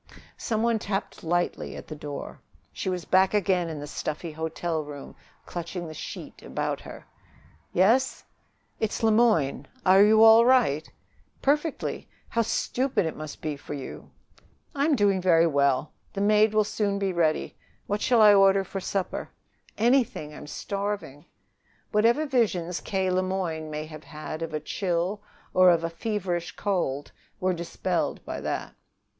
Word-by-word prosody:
Some 220 Hz, -1 st, -2 dB
one 230 Hz, -1 st, +2 dB
tapped 200 Hz, -1 st, -4 dB
lightly 175 Hz, +2 st, -1 dB
at -, -, -8 dB
the 155 Hz, -, -7 dB
door. 145 Hz, -1 st, -7 dB, 0.3 s
She -, -, -3 dB
was 180 Hz, -2 st, -3 dB
back 190 Hz, +2 st, +3 dB
again 185 Hz, -4 st, +1 dB
in 155 Hz, -2 st, -5 dB
the 145 Hz, -, -6 dB
stuffy 155 Hz, +2 st, -4 dB
hotel 160 Hz, +1 st, -3 dB
room, 145 Hz, -1 st, -9 dB, 0.3 s
clutching 175 Hz, +1 st, -5 dB
the 155 Hz, -, -7 dB
sheet -, -, -8 dB
about -, -, -3 dB
her. -, -, -11 dB, 0.7 s
"Yes?" 230 Hz, +9 st, +3 dB, 0.6 s
"It's 220 Hz, +1 st, -2 dB
Le 220 Hz, -, +5 dB
Moyne. 215 Hz, -, +2 dB, 0.2 s
Are 190 Hz, +2 st, +7 dB
you 220 Hz, +1 st, +6 dB
all 225 Hz, +1 st, +9 dB
right?" 235 Hz, -, +3 dB, 0.5 s
"Perfectly. 295 Hz, +3 st, 0 dB, 0.2 s
How 230 Hz, -, +1 dB
stupid 250 Hz, 0 st, 0 dB
it 160 Hz, -, -3 dB
must 155 Hz, -1 st, -8 dB
be 155 Hz, -2 st, -2 dB
for 145 Hz, +1 st, -7 dB
you!" 135 Hz, -, -8 dB, 0.6 s
"I'm 285 Hz, +2 st, +2 dB
doing 200 Hz, -5 st, +2 dB
very 170 Hz, -2 st, +5 dB
well. 140 Hz, -2 st, +2 dB, 0.2 s
The 195 Hz, -, -4 dB
maid 210 Hz, +1 st, +4 dB
will 215 Hz, -, +5 dB
soon 205 Hz, -1 st, -1 dB
be 195 Hz, -2 st, -1 dB
ready. 160 Hz, -3 st, 0 dB, 0.3 s
What 205 Hz, +1 st, -2 dB
shall 235 Hz, -3 st, +4 dB
I 210 Hz, -1 st, +9 dB
order 195 Hz, -1 st, +5 dB
for 195 Hz, +1 st, -5 dB
supper?" 190 Hz, 0 st, -3 dB, 0.5 s
"Anything. 230 Hz, -, +1 dB
I'm 150 Hz, -, -10 dB
starving." 200 Hz, -5 st, -4 dB, 0.7 s
Whatever 235 Hz, +8 st, +3 dB
visions 195 Hz, -, 0 dB
K. 190 Hz, -2 st, -1 dB
Le 185 Hz, 0 st, +2 dB
Moyne 180 Hz, -4 st, -3 dB
may 155 Hz, 0 st, -4 dB
have 155 Hz, -1 st, -11 dB
had 155 Hz, +1 st, -7 dB
of 165 Hz, -1 st, -3 dB
a 155 Hz, -, -2 dB
chill 180 Hz, +5 st, -2 dB, 0.3 s
or 185 Hz, 0 st, +7 dB
of 170 Hz, -1 st, +3 dB
a 165 Hz, -, -2 dB
feverish 180 Hz, -2 st, -3 dB
cold 170 Hz, -9 st, -2 dB, 0.3 s
were 185 Hz, 0 st, +1 dB
dispelled 170 Hz, -1 st, -2 dB
by -, -, -5 dB
that. -, -, -3 dB
185 Hz, 155 wpm, -26 LUFS, 160-210 Hz, 0.7 s, all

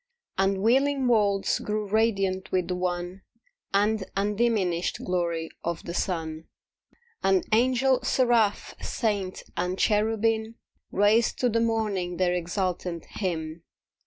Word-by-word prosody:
And 195 Hz, 0 st, +1 dB
wheeling 270 Hz, +3 st, +3 dB
worlds 205 Hz, -4 st, +2 dB
grew 210 Hz, 0 st, -2 dB
radiant 195 Hz, -3 st, +1 dB
with 180 Hz, -1 st, 0 dB
the 180 Hz, -, 0 dB
one 180 Hz, +1 st, -3 dB, 0.5 s
And 210 Hz, +1 st, +2 dB
undiminished 200 Hz, -4 st, 0 dB
glory 170 Hz, -3 st, -1 dB
of 170 Hz, -1 st, -3 dB
the 170 Hz, -, -6 dB
sun. 160 Hz, -3 st, -2 dB, 0.8 s
And 190 Hz, -1 st, +2 dB
Angel, 255 Hz, +3 st, +3 dB
Seraph, 240 Hz, -5 st, +2 dB
Saint 205 Hz, -5 st, -2 dB
and 180 Hz, +2 st, -1 dB
Cherubim 220 Hz, +1 st, +1 dB, 0.4 s
Raised 210 Hz, +3 st, +3 dB
to 250 Hz, -, +3 dB
the 230 Hz, 0 st, +1 dB
morning 210 Hz, -6 st, -1 dB
their 180 Hz, -1 st, +2 dB
exultant 180 Hz, -1 st, -2 dB
hymn. 165 Hz, -4 st, -3 dB
195 Hz, 115 wpm, -26 LUFS, 180-225 Hz, 0.8 s, wheeling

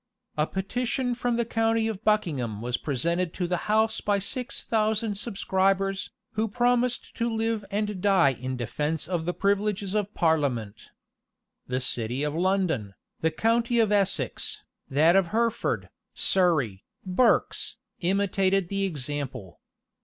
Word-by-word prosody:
A 150 Hz, +1 st, +1 dB
petition 245 Hz, +6 st, -1 dB
from 245 Hz, 0 st, -1 dB
the 235 Hz, 0 st, 0 dB
county 225 Hz, 0 st, +1 dB
of 220 Hz, -2 st, -4 dB
Buckingham 145 Hz, -, 0 dB
was 120 Hz, +2 st, -1 dB
presented 165 Hz, +7 st, -1 dB
to 180 Hz, -, -1 dB
the 180 Hz, +3 st, -2 dB
house 220 Hz, +1 st, +2 dB
by 205 Hz, -1 st, +2 dB
six 250 Hz, +6 st, -4 dB
thousand 220 Hz, -1 st, +1 dB
subscribers, 195 Hz, -2 st, 0 dB, 0.2 s
who 220 Hz, +1 st, 0 dB
promised 245 Hz, +2 st, +1 dB
to 235 Hz, 0 st, 0 dB
live 225 Hz, -1 st, -1 dB
and 210 Hz, -2 st, -2 dB
die 190 Hz, -8 st, +5 dB
in 130 Hz, +1 st, -4 dB
defence 150 Hz, +6 st, -2 dB
of 170 Hz, -3 st, -2 dB
the 175 Hz, -, -1 dB
privileges 200 Hz, 0 st, 0 dB
of 210 Hz, -1 st, 0 dB
parliament.[*] 135 Hz, -, 0 dB, 0.8 s
The 125 Hz, 0 st, -1 dB
city 125 Hz, +2 st, 0 dB
of 150 Hz, 0 st, -1 dB
London, 165 Hz, -, 0 dB, 0.2 s
the 160 Hz, -, +2 dB
county 230 Hz, +7 st, +1 dB
of 220 Hz, -3 st, +3 dB
Essex, 200 Hz, -2 st, 0 dB, 0.3 s
that 155 Hz, +6 st, +4 dB
of 195 Hz, -2 st, +4 dB
Hertford, 230 Hz, +4 st, 0 dB, 0.3 s
Surrey, 155 Hz, -, +2 dB, 0.2 s
Berks, 190 Hz, +7 st, +2 dB, 0.2 s
imitated 195 Hz, 0 st, +1 dB
the 195 Hz, 0 st, 0 dB
example. 140 Hz, -, -5 dB
195 Hz, 135 wpm, -27 LUFS, 155-220 Hz, 0.8 s, die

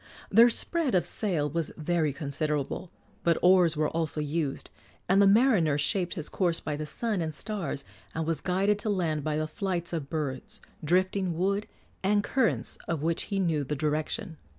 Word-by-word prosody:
Their 230 Hz, +4 st, +8 dB
spread 305 Hz, -, -1 dB
of 180 Hz, -, +3 dB
sail 175 Hz, -9 st, -1 dB
was 165 Hz, +2 st, -2 dB
very 160 Hz, -1 st, +1 dB
considerable, 150 Hz, +3 st, -2 dB, 0.3 s
but 170 Hz, -1 st, +3 dB
oars 180 Hz, -3 st, +5 dB
were 155 Hz, 0 st, +2 dB
also 160 Hz, -2 st, -2 dB
used, 150 Hz, -1 st, -2 dB, 0.4 s
and 195 Hz, +2 st, +5 dB
the 200 Hz, -, +6 dB
mariner 200 Hz, -, +4 dB
shaped 175 Hz, +5 st, 0 dB
his 160 Hz, -, -4 dB
course 175 Hz, -3 st, 0 dB
by 150 Hz, -, -3 dB
the 150 Hz, +1 st, -5 dB
sun 210 Hz, +3 st, -2 dB
and 155 Hz, -2 st, -3 dB
stars, 170 Hz, -9 st, -3 dB, 0.3 s
and 160 Hz, 0 st, -1 dB
was 160 Hz, -2 st, -1 dB
guided 195 Hz, +3 st, +1 dB
to 215 Hz, -, -2 dB
land 165 Hz, -7 st, 0 dB
by 150 Hz, 0 st, -1 dB
the 155 Hz, -, 0 dB
flights 175 Hz, 0 st, -3 dB
of 150 Hz, -4 st, -3 dB
birds, 140 Hz, -5 st, -4 dB, 0.2 s
drifting 185 Hz, +1 st, +1 dB
wood, 200 Hz, +4 st, 0 dB, 0.3 s
and 205 Hz, +1 st, +2 dB
currents 260 Hz, -1 st, 0 dB
of 160 Hz, -3 st, -2 dB
which 165 Hz, +1 st, 0 dB
he 200 Hz, -, -1 dB
knew 165 Hz, -6 st, +1 dB
the 150 Hz, +2 st, -3 dB
direction. 155 Hz, +2 st, -2 dB
170 Hz, 175 wpm, -28 LUFS, 150-195 Hz, 0.4 s, Their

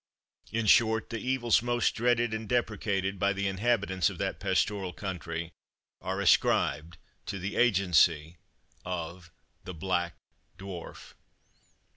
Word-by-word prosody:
In 115 Hz, +1 st, -1 dB
short, 110 Hz, +1 st, +4 dB
the 115 Hz, -, -3 dB
evils 125 Hz, -2 st, +2 dB
most 120 Hz, 0 st, +1 dB
dreaded 120 Hz, -1 st, +1 dB
and 110 Hz, -1 st, -5 dB
deprecated 100 Hz, -5 st, -1 dB
by 100 Hz, +1 st, +2 dB
the 100 Hz, 0 st, -2 dB
inhabitants 95 Hz, -3 st, +1 dB
of -, -, -9 dB
that -, -, -3 dB
pastoral 95 Hz, -1 st, 0 dB
country, 85 Hz, -4 st, -5 dB, 0.5 s
are 95 Hz, +1 st, -3 dB
ascribed 85 Hz, -3 st, +2 dB, 0.3 s
to 100 Hz, -, -3 dB
the 95 Hz, +2 st, -4 dB
agency 90 Hz, -7 st, +3 dB, 0.5 s
of 85 Hz, -1 st, -6 dB, 0.3 s
the 90 Hz, -, -8 dB
BLACK 90 Hz, 0 st, -1 dB, 0.4 s
DWARF. 95 Hz, -3 st, -9 dB
95 Hz, 120 wpm, -29 LUFS, 90-110 Hz, 0.5 s, short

